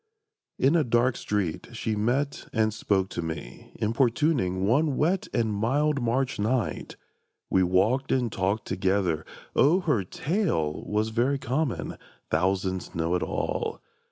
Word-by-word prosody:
In 140 +5 +3
a 165 - +4
dark 120 0 +2
street 100 -6 -2
she 110 -1 -2
met 130 +7 -1
and 110 -2 +1
spoke 100 -3 0
to - - -4
me, 80 -6 -7
Importuning, 115 - +1
one 140 +6 +2
wet 175 +5 +1
and 110 -2 0
mild 140 +7 +1
March 125 +2 0
night. 115 +2 -1 0.6
We 95 - +4
walked 100 +9 +2
and 125 -4 +1
talked 100 +3 -1
together. 95 -4 0 0.3
O 165 +7 +4
her 145 - +1
tale 135 - -1
Was 105 +1 0
very 125 +5 +1
common; 135 +1 -2 0.3
thousands 95 +2 0
know 85 +1 0
it 90 - +1
all! - - -2
110 Hz, 135 wpm, -27 LUFS, 95-135 Hz, 0.6 s, a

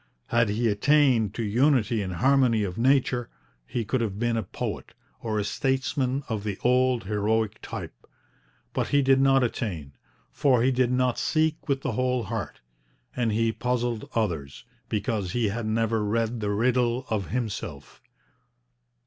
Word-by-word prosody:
Had 115 -2 +3
he 115 +3 0
attained 115 -1 +3
to 115 - -2
unity 120 0 +2
and 95 -2 -4
harmony 125 0 +3
of 90 -3 -3
nature, 125 0 +2 0.4
he 120 -2 -3
could 130 +3 0
have 105 -4 -2
been 120 +1 0
a 115 - 0
poet, 90 - -6 0.3
or 110 -2 -2
a 105 - +1
statesman 130 +3 -1
of 110 -3 -3
the 105 -3 -3
old 125 -1 +3
heroic 105 +1 -1
type. - - -8 0.7
But - - -1
he 145 -1 +3
did 135 0 +4
not 135 -1 +4
attain, 95 - -3 0.4
for 125 -4 +2
he 130 - +3
did 125 -1 +1
not 125 -1 +1
seek 155 -1 0
with 135 -1 +1
the 135 - -2
whole 125 +1 0
heart. 105 -6 -5 0.5
And 120 -3 0
he 115 +1 +1
puzzled 120 -1 -2
others, 85 - -2 0.2
because 105 -3 -2
he 120 -4 +1
had 110 +2 -3
never 110 0 0
read 115 +2 -1
the 105 -1 -2
riddle 120 +3 +1
of 100 -5 -1
himself. 100 - -5
115 Hz, 155 wpm, -26 LUFS, 105-125 Hz, 0.7 s, did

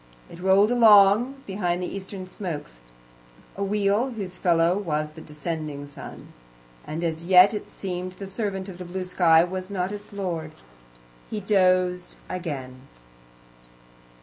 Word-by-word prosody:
It 170 - -11
rolled 190 +4 +4
along 230 +3 +5
behind 180 -3 -1
the 180 - -3
eastern 190 -1 -7
smokes 165 - -7 0.8
a 200 - -3
wheel, 205 +4 +1
whose 200 -7 -6
fellow 170 -1 +2
was 155 -6 -2
the 160 +1 -12
descending 150 -2 -5
moon - - -10 0.5
and 160 +3 -5
as 165 0 -3
yet 185 +3 +7
it 210 - -5
seemed 180 -1 -5
the 195 - -8
servant 195 -1 -3
of 185 -2 -9
the 180 - -6
blue 185 +1 -4
sky, 170 -2 +4 0.2
not 190 -1 -2
its 205 0 -8
lord. 170 -6 -4 0.8
He 215 - -3
dozed 185 -3 +2
again. 135 -7 -6
185 Hz, 135 wpm, -25 LUFS, 165-200 Hz, 0.8 s, yet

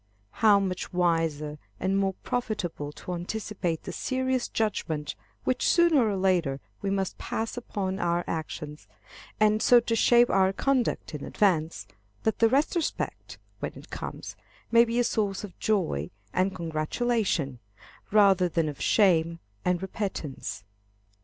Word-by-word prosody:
How 210 -3 +7
much 185 -2 -3
wiser 165 -4 0 0.2
and 190 +1 0
more 195 -1 +1
profitable 195 -11 -3
to 180 - -7
anticipate 180 -1 -3
the - - -5
serious 260 -1 -1
judgment 160 -9 -2 0.3
which 255 - +1
sooner 325 -10 +4
or 200 - -1
later 175 -8 +1 0.2
we 200 - -1
must 195 -1 -1
pass 225 0 -3
upon 200 -5 -3
our 175 -1 +1
actions, 155 -2 -5 0.5
and 215 0 +4
so 245 - +7
to 230 0 -1
shape 240 +2 +5
our 190 0 +3
conduct 260 -6 0
in 150 - -5
advance, 170 -6 +1 0.4
that 220 - 0
the 225 - +5
retrospect, 300 +5 -1 0.2
when - - -4
it - - -13
comes, - - -6 0.4
may 235 0 +7
be 235 0 -2
a 245 - +4
source 205 -3 -1
of 200 -4 -8
joy 165 - 0 0.2
and 185 +1 +1
congratulation, 165 - -1 0.5
rather 195 -4 +5
than 165 -1 0
of 145 -2 -6
shame 170 -5 +3 0.3
and 180 0 0
repentance. 155 - -4
190 Hz, 140 wpm, -27 LUFS, 165-220 Hz, 0.5 s, How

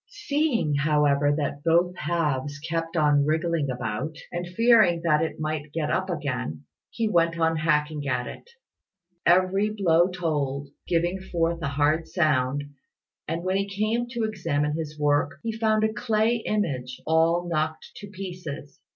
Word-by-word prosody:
Seeing, 290 - 0
however, 145 -1 +3
that 145 -1 -3
both 170 +2 +3
halves 150 -4 -1
kept 165 +2 -3
on 145 -2 +4
wriggling 160 -1 0
about, 125 +4 -3 0.2
and 175 0 -4
fearing 200 -3 +4
that 155 -2 +3
it 160 0 -3
might 155 -1 -3
get 155 -2 -1
up - - 0
again, 75 +5 -3 0.3
he 230 -2 -1
went 170 -4 +2
on 165 0 +2
hacking 150 -2 0
at 125 -2 0
it. 475 - -10 0.8
Every 185 +4 +4
blow 175 -5 +3
told, 145 -6 -2 0.2
giving 175 +2 +1
forth 170 -2 -1
a 145 - -1
hard 150 +3 +1
sound, 145 -5 +1 0.6
and 165 +2 -3
when 185 +1 +1
he 200 0 -1
came 215 +4 -1
to 235 -2 -3
examine 165 -9 -1
his 155 -2 -5
work, 145 -1 +2
he 230 - -1
found 220 -1 +1
a 220 0 +1
clay 220 +1 +1
image 130 -12 -2
all 165 +2 +2
knocked 155 -1 -2
to 205 - -8
pieces. 180 -8 -8
165 Hz, 150 wpm, -25 LUFS, 150-185 Hz, 0.8 s, on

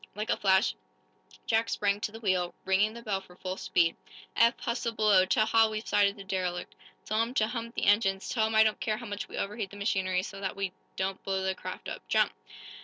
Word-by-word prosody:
Like 215 +2 -2
a - - +1
flash 190 +2 +3 0.7
Jack 225 0 +1
sprang 205 0 0
to 210 - -2
the 225 - -9
wheel, 185 -5 0
ringing 200 +4 +2
the 235 - -9
bell 200 -4 -1
for 180 -2 -17
full 185 0 -4
speed. 170 -3 +1 0.4
"Eph, 230 0 +4
hustle 235 0 -2
below! 210 -4 +4
Tell 215 +3 +3
Hal 225 0 +4
we've 215 +1 -5
sighted 200 -1 +3
the 200 - -9
derelict. 185 -2 -3 0.3
Tell 215 +1 +1
him 235 +3 -2
to 215 - +3
hump 230 +1 -5
the - - -1
engines. 195 -1 +3
Tell 220 -3 +1
him 220 - -2
I 220 - +8
don't 215 -1 +1
care 215 -1 -1
how 240 - -8
much 205 -2 -5
we - - -7
overheat 205 0 -3
the 205 - -11
machinery 190 -3 0
so 195 0 -7
that 190 - -3
we 195 -1 -2 0.2
don't 190 0 -2
blow 190 -1 -1
the 190 0 +1
craft 185 0 -7
up. - - -5
Jump!" - - +2
205 Hz, 230 wpm, -29 LUFS, 190-220 Hz, 0.7 s, I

